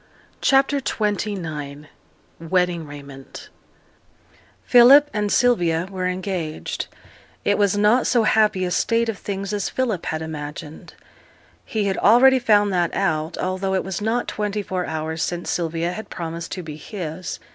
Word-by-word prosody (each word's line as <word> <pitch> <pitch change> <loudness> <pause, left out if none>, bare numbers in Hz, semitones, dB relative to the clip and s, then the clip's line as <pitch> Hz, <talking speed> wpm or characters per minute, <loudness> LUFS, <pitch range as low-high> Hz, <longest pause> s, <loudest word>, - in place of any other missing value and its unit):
CHAPTER 275 +1 +3
XXIX 170 - -3 0.5
WEDDING 170 -1 0
RAIMENT 140 -2 -11 1.2
Philip 270 +4 +7
and 210 -1 -1
Sylvia 175 -9 +2
were 185 -1 -2
engaged. 180 -4 -4 0.6
It 205 - +3
was 205 -1 +2
not 210 +5 +3
so 240 -3 +3
happy 215 -3 +3
a 180 - -3
state 230 +5 +1
of 215 - -4
things 195 0 -4
as 205 -2 -1
Philip 230 -9 -2
had 160 0 -2
imagined. 150 0 -8 0.7
He 215 -2 -2
had 195 -1 -1
already 260 +5 +6
found 205 -4 +3
that 175 -2 0
out, 160 -3 -1
although 190 +1 -1
it 190 - 0
was 190 0 -4
not 225 +3 0
twenty 210 0 -2
four 185 -2 -3
hours 160 +1 -3
since 175 0 -2
Sylvia 170 0 -1
had 210 +2 -7
promised 170 0 -6
to 180 - -5
be 155 -2 -8
his. 175 -1 -6
190 Hz, 145 wpm, -22 LUFS, 165-210 Hz, 1.2 s, Philip